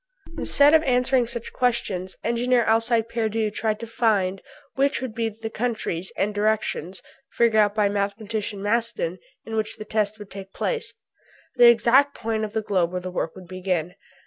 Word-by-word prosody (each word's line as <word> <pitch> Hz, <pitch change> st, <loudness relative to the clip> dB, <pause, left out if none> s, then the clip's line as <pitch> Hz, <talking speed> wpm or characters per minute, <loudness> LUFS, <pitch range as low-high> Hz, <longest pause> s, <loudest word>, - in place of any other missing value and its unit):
Instead 285 Hz, +1 st, +4 dB
of 320 Hz, -, +7 dB
answering 250 Hz, -3 st, +2 dB
such 235 Hz, 0 st, -6 dB
questions 220 Hz, -7 st, -1 dB
Engineer 240 Hz, +1 st, +2 dB
Alcide 225 Hz, +1 st, +2 dB
Pierdeux 220 Hz, -2 st, -1 dB
tried 215 Hz, 0 st, -1 dB
to 230 Hz, -, -5 dB
find 205 Hz, -5 st, +1 dB, 0.3 s
which 275 Hz, +1 st, +1 dB
would 260 Hz, -4 st, -5 dB
be 225 Hz, 0 st, -1 dB
the 225 Hz, +1 st, -7 dB
countries 220 Hz, -7 st, -3 dB
and 210 Hz, +2 st, 0 dB
directions, 205 Hz, -4 st, -1 dB, 0.3 s
figured 235 Hz, -2 st, +3 dB
out 205 Hz, 0 st, +1 dB
by 210 Hz, -1 st, +3 dB
Mathematician 205 Hz, 0 st, -3 dB
Maston, 235 Hz, -, -1 dB, 0.3 s
in 225 Hz, -, -5 dB
which 215 Hz, -1 st, -1 dB
the 215 Hz, -, -7 dB
test 215 Hz, 0 st, -1 dB
would 210 Hz, -2 st, -11 dB
take 195 Hz, 0 st, -9 dB
place 470 Hz, -, -2 dB, 0.6 s
the 240 Hz, -1 st, +9 dB
exact 260 Hz, +4 st, +4 dB
point 220 Hz, -1 st, -2 dB
of 215 Hz, -1 st, -4 dB
the 220 Hz, -, -1 dB
globe 180 Hz, -5 st, +1 dB
where 180 Hz, -, -2 dB
the 185 Hz, 0 st, -6 dB
work 165 Hz, -2 st, -3 dB
would 185 Hz, -2 st, -12 dB
begin. 180 Hz, -2 st, -2 dB
220 Hz, 170 wpm, -24 LUFS, 200-235 Hz, 0.6 s, the